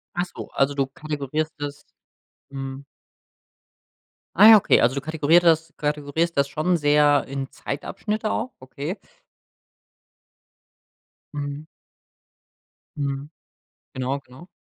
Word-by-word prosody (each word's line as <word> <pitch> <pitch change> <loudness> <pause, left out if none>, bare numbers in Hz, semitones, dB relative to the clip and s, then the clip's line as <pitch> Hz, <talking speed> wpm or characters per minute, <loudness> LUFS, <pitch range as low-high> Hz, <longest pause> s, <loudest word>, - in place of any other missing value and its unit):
Ach 175 +1 0
so, - - -7
also, 135 +1 +1
du 135 -1 0
kategorisierst 150 +2 -4
das 145 0 -6 0.6
mhm. 135 0 -6 1.5
Ah, 215 +4 +10
okay, - - +4
also, 125 +3 +3
du 140 - -2
kategorier 160 +1 +3
das 165 -2 +2
kategorisierst 150 +2 -1
das 140 0 +3
schon 170 +4 +1
sehr 145 -1 +4
in 135 0 -5
Zeitabschnitte 210 +9 -4
auch, 255 - -2
okay. 140 +8 -6 2.4
Mhm. 145 +1 -5 1.3
Mhm. 140 0 -3 0.7
Genau, 130 +2 -2
genau. 135 +7 -15
145 Hz, 105 wpm, -23 LUFS, 140-160 Hz, 2.4 s, Ah